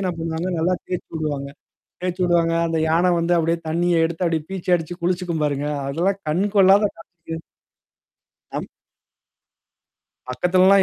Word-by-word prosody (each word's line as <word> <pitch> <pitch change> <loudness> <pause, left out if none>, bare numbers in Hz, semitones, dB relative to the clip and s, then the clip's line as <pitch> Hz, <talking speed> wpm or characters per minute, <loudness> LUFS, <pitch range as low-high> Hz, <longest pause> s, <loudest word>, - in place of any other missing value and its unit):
என்ன 185 -2 0
பண்ணுவாங்க, 165 +2 -2
நல்லா 175 +3 +2
தேர்ச்சு 180 - -4
விடுவாங்க. 145 -3 -2 0.5
தேயச்சு 180 0 -1
விடுவாங்க. 170 -1 +2
அந்த 165 -1 -1
யானை 170 +3 +3
வந்து 170 +1 +2
அப்டியியே 165 0 +1
தண்ணீய 170 +1 +2
எடுத்து 170 +2 -3
அப்டி 165 -1 +1
பீச்சு 185 -1 -2
அடிச்சு 170 +1 -6
குளிச்சுக்கும் 175 -2 -1
பாருங்க. 145 0 -1 0.2
அதெல்லாம் 180 +8 0
கண் 170 +6 +1
கொள்ளாத 195 +1 +7 0.4
காட்சி. 165 0 -5 1.2
அம் - - -3 1.6
பக்கத்துலலாம் 185 +7 +4
170 Hz, 135 wpm, -22 LUFS, 160-180 Hz, 1.6 s, கொள்ளாத